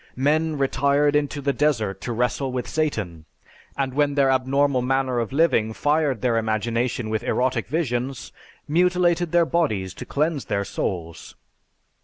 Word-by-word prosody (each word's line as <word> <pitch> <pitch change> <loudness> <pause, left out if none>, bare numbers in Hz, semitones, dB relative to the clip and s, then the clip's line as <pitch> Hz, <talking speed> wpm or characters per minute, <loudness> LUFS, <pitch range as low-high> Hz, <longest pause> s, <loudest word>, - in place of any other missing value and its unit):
Men 155 +3 +1
retired 140 +2 +2
into 145 0 0
the 140 0 0
desert 110 -11 0
to 120 - -4
wrestle 125 +3 -1
with 125 -1 -3
Satan, 105 - -2 0.5
and 135 -2 -1
when 145 0 +1
their 135 -2 +3
abnormal 130 +1 +2
manner 130 -1 0
of 115 - -3
living 135 -7 +2
fired 145 -2 0
their 120 -2 +1
imagination 115 +2 -1
with 110 - -1
erotic 125 -2 0
visions, 130 -4 -2 0.4
mutilated 175 +1 +2
their 175 -1 +4
bodies 110 - -1
to - - -8
cleanse 150 -1 -1
their 100 0 -1
souls. 85 -4 -5
135 Hz, 145 wpm, -23 LUFS, 115-150 Hz, 0.5 s, their